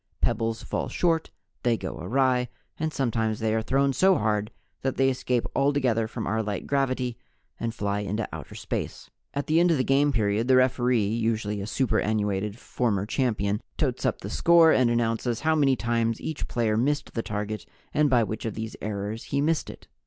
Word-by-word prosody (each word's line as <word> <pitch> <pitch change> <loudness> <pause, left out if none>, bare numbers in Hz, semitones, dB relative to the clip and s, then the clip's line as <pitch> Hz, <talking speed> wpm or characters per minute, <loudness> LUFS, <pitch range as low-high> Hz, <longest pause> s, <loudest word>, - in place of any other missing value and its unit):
Pebbles 115 0 0
fall - - -3
short, 165 -2 +1 0.3
they 120 -2 +2
go 95 - -5
awry, 125 +6 +1 0.3
and 160 0 -1
sometimes 115 -6 0
they 110 0 0
are 110 - +1
thrown 135 +4 +1
so 190 +6 +4
hard 105 -1 0 0.3
that 135 -1 -1
they 135 0 +4
escape 125 -2 -1
altogether 130 -5 +2
from 110 0 -5
our 110 +2 0
light 105 -3 -3
gravity 130 -3 -1 0.4
and 115 - -1
fly 100 -2 -1
into 105 +2 -2
outer - - -8
space. - - -5 0.2
At 140 - -1
the 155 +2 +3
end 175 +1 +4
of 165 - +3
the 130 - +2
game 140 +2 +3
period 110 -1 +1
the 130 - +5
referee 125 -3 +3
(usually 110 -1 -1
a 100 - -5
superannuated 105 -4 0
former 105 -6 -1
champion) 105 -4 0 0.2
tots - - -1
up - - 0
the - - -6
score 170 -1 +6
and 125 -2 +4
announces 115 0 0
how 160 0 +2
many 140 -4 +3
times 115 -2 0
each 160 - -4
player 115 -3 0
missed 145 +6 0
the 115 - -1
target 105 -1 -4 0.3
and 150 0 +3
by 120 -3 +4
which 110 0 -4
of 110 - -3
these 110 0 -5
errors 105 +1 -4
he 140 - -1
missed 155 +2 +1
it. - - -11
115 Hz, 190 wpm, -26 LUFS, 110-135 Hz, 0.4 s, score